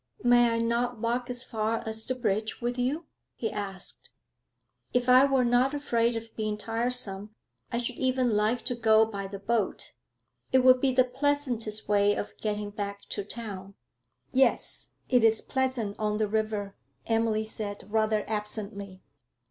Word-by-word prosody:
'May 240 -1 +5
I - - 0
not 235 +1 0
walk 240 +3 -1
as 245 0 -3
far 225 -2 -2
as 220 0 -2
the 255 - -1
bridge 215 -3 -1
with 240 0 -2
you?' 285 +7 -1 0.3
he 225 - -3
asked. 195 -3 -5 0.8
'If 245 0 +1
I 255 +2 +7
were 270 -2 +2
not 245 +4 +3
afraid 235 -5 +1
of 225 0 -7
being 215 -1 -2
tiresome 225 -2 0 0.4
I 235 - 0
should 240 0 -3
even 255 -3 +1
like 215 +4 +1
to 250 - +1
go 220 -2 +4
by 200 -3 -5
the 200 +1 -7
boat; 210 +1 -1 0.6
it 260 -1 +4
would 255 0 +6
be 270 - +3
the 255 0 +5
pleasantest 250 -5 -1
way 205 0 +3
of - - -5
getting 210 -1 -3
back 200 -1 -5
to 205 - -3
town.' 200 -3 -7 0.6
'Yes, 265 +1 +1 0.2
it 250 -2 +3
is 225 -1 +5
pleasant 255 -6 -1
on 210 -1 0
the 215 -1 +1
river,' 215 -2 -2 0.3
Emily 225 -1 +1
said 205 -2 -6
rather 215 -1 +1
absently. 205 -3 -5
225 Hz, 160 wpm, -28 LUFS, 210-245 Hz, 0.8 s, I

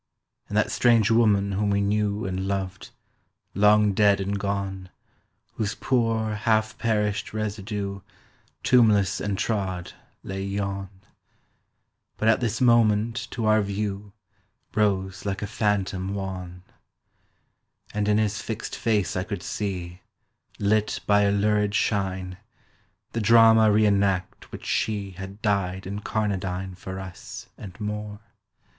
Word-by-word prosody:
And - - -2
that - - +2
strange 115 -2 +4
woman 105 -3 +3
whom 100 +1 0
we 100 0 +2
knew 105 +1 0
And 95 0 -3
loved—long 100 +2 -1
dead 100 0 +4
and 100 +1 -2
gone, 95 -2 -3 0.7
Whose 105 -2 -1
poor 115 -4 0
half 110 +1 +1
perished 105 -2 -1
residue, 100 -2 -3 0.6
Tombless 110 -6 +4
and 100 -1 -2
trod, 95 -5 -2 0.3
lay 95 0 -5
yon! 100 -1 -3 1.3
But 110 - +2
at 115 - +4
this 115 -3 -1
moment 115 0 +3
to 115 -3 -3
our 110 0 +4
view 100 0 -3 0.6
Rose 95 -3 0
like 100 0 -3
a - - 0
phantom 100 -2 -1
wan. 90 -2 -6 1.3
And 105 -1 -1
in 105 0 +3
his 110 -1 0
fixed 110 -1 -5
face 105 -6 0
I 90 - 0
could 100 -3 -5
see, 90 -3 -4 0.6
Lit 105 +1 +1
by 105 0 +4
a 100 -1 +3
lurid 105 0 +1
shine, 95 -3 -1 0.7
The 115 - -2
drama 110 0 +6
re 105 +1 +4
enact 100 -3 0
which - - -9
she 100 -3 -1
Had 95 +3 -9
dyed 95 -3 0
incarnadine 95 -2 -2
For 95 +1 -7
us, 95 -2 -9
and 100 -1 -11
more. 105 0 -4
100 Hz, 125 wpm, -25 LUFS, 95-110 Hz, 1.3 s, drama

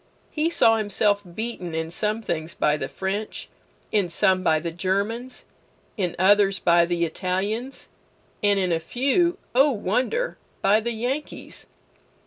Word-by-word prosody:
He 310 +2 0
saw 225 -9 +4
himself 205 -1 +1
beaten 215 -7 -4
in 160 0 -3
some 215 +4 -1
things 160 -3 -3
by 150 - +2
the 135 -3 -3
French, 195 +6 -4 0.4
in 200 -4 +1
some 185 +2 +2
by 160 -3 +3
the 165 +2 -3
Germans, 200 +8 -2 0.5
in 180 -6 -2
others 195 +1 +4
by 170 -1 +4
the 170 -1 0
Italians, 200 +10 -3 0.5
and 205 -1 +3
in 185 -2 0
a 165 - +2
few 275 - +1 0.2
(O 270 +4 +5
wonder!) 255 - -1 0.2
by 200 +2 +5
the 235 +2 -3
Yankees. 250 +7 -4
205 Hz, 140 wpm, -24 LUFS, 175-235 Hz, 0.5 s, O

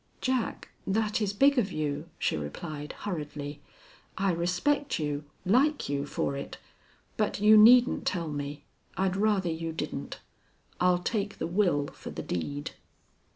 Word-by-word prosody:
"Jack, 255 -3 -1 0.2
that 215 +2 +1
is 205 -2 +1
big 275 +6 +4
of 200 -4 0
you," 150 +1 -3
she - - 0
replied, 145 - -6
hurriedly. 150 -6 -5 0.6
"I 195 0 +2
respect 185 - 0
you 150 -1 -2 0.2
like 270 - +3
you 140 0 -1
for 140 - -1
it. 140 - -6 0.6
But 215 -2 0
you 210 +1 +7
needn't 240 +3 +7
tell 170 -3 -1
me. 145 0 -5 0.3
I'd 190 -1 +1
rather 200 -4 +2
you 165 0 -3
didn't. 160 - -5 0.6
I'll 180 0 +4
take 205 -1 -2
the - - -2
will 170 -5 +2
for - - -9
the - - -6
deed." 75 -4 -3
180 Hz, 145 wpm, -29 LUFS, 145-210 Hz, 0.6 s, you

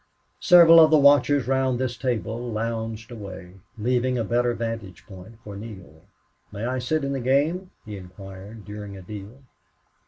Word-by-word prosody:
Several 170 -2 +7
of 160 -1 +7
the 155 - +5
watchers 145 -2 +4
round 130 -1 +1
this 125 -1 -2
table 120 -1 -3
lounged 115 +1 -4
away, 95 -4 -10 0.2
leaving 125 +3 0
a 115 - 0
better 120 +2 0
vantage 115 -7 -6
place 95 +2 -12
for 105 -1 -9
Neale. 95 -7 -11 0.5
"May 105 +2 -5
I 130 +1 -2
sit 150 +5 -1
in 140 0 -2
the 135 - -2
game?" 145 +9 0 0.2
he 105 -2 -7
inquired, 95 +3 -11
during 105 -1 -8
a 95 - -11
deal. 105 +7 -10
115 Hz, 160 wpm, -24 LUFS, 100-130 Hz, 0.5 s, Several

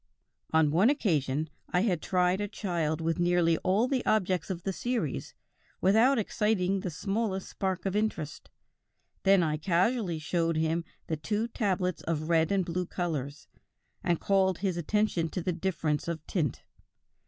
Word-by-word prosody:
"On 160 -2 +4
one 185 - +4
occasion 155 - +1 0.2
I 180 - +2
had 185 -6 +1
tried 180 +1 +1
a 205 - -1
child 170 -6 -2
with 165 +1 -1
nearly 175 -2 +3
all 200 +6 +2
the 260 -2 0
objects 185 -6 +1
of 175 -2 -4
the 195 - -2
series 230 - -3 0.4
without 225 +8 +4
exciting 205 -3 +1
the 185 - -3
smallest 195 +3 -2
spark 190 -2 -3
of 195 0 -1
interest; 210 -8 -2 0.7
then 195 -2 +5
I 155 -1 0
casually 180 +3 +1
showed 165 +1 0
him 160 +1 0 0.2
the 160 - -2
two 210 +9 -2
tablets 185 -5 -1
of 155 -1 -2
red 165 0 +3
and 195 -2 +2
blue 180 +1 -2
colors, 150 -6 -4 0.6
and 175 -2 +1
called 190 -2 +2
his 190 -2 -1
attention 175 -1 0
to 180 - -3
the 180 - 0
difference 165 -4 -1
of 160 -2 -4
tint. 155 - -2
180 Hz, 155 wpm, -29 LUFS, 165-195 Hz, 0.7 s, then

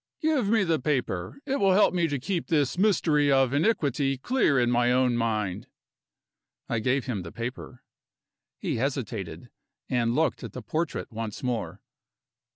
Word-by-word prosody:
Give 305 - +1
me 220 -2 +3
the 165 -4 +1
paper; 130 - -2
it 275 0 -1
will 195 -2 +4
help 200 0 +4
me 170 -2 +2
to 145 -2 -2
keep 170 +6 -3
this 145 -5 +1
mystery 160 -7 +3
of 135 -1 +3
iniquity 145 - +1
clear 150 - +2
in 120 0 +2
my 120 0 +3
own 125 -1 +3
mind." 110 -5 -1 1.0
I 115 - -1
gave 130 +4 0
him 115 -7 -3
the 85 -1 -8
paper. 120 +1 -7 0.7
He - - -2
hesitated 115 - -3 0.4
and 120 -2 +1
looked 160 +1 0
at - - -7
the - - -7
portrait 160 -3 -3
once 110 0 -5
more. 105 -7 -3
130 Hz, 160 wpm, -27 LUFS, 115-165 Hz, 1.0 s, will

